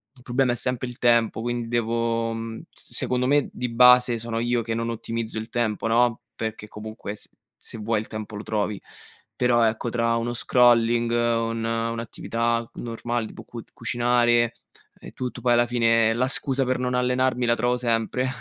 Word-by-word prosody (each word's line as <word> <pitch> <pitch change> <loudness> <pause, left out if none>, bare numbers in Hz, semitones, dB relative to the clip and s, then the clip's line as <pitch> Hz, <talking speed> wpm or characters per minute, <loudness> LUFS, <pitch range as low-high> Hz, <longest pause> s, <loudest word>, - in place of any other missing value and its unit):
il 125 - -17
problema 125 0 +1
è - - -3
sempre 125 +1 0
il 120 - -9
tempo, 120 -2 +2
quindi 120 0 -3
devo, 115 0 -1
mhmm, 115 0 -6
s - - -2
secondo 125 0 +2
me, 145 0 +2
di 125 - -4
base, 125 0 +6
sono 115 0 -3
io 120 0 0
che 115 0 -3
non 115 0 -2
ottimizzo 115 0 -4
il 110 +1 -5
tempo, 115 -2 -2
no, 120 0 +2
perché 110 -1 -5
comunque 105 -1 -8
s - - -7 0.4
se - - -4
vuoi 110 0 -1
il 110 - -10
tempo 110 -1 -7
lo 105 - -6
trovi, 105 -2 -2 0.6
però, 120 -1 +2
ecco, 110 +2 -1
tra 115 0 0
uno 120 +1 -2
scrolling, 120 -1 +3
un 115 -1 0
un'attività 115 0 -2
normale 120 0 -3
tipo - - -11
cu 120 -1 -9
cucinare 120 0 +1 0.5
e - - -11
tutto 125 -1 -5
poi, 120 -1 +2
alla 120 0 +4
fine, 115 -2 +2
la 125 +3 0
scusa 135 0 +5
per 130 0 0
non 125 0 -2
allenarmi 125 0 +1
la 120 0 +3
trovo 125 +1 0
sempre 120 +1 -1
115 Hz, 180 wpm, -24 LUFS, 115-120 Hz, 0.6 s, base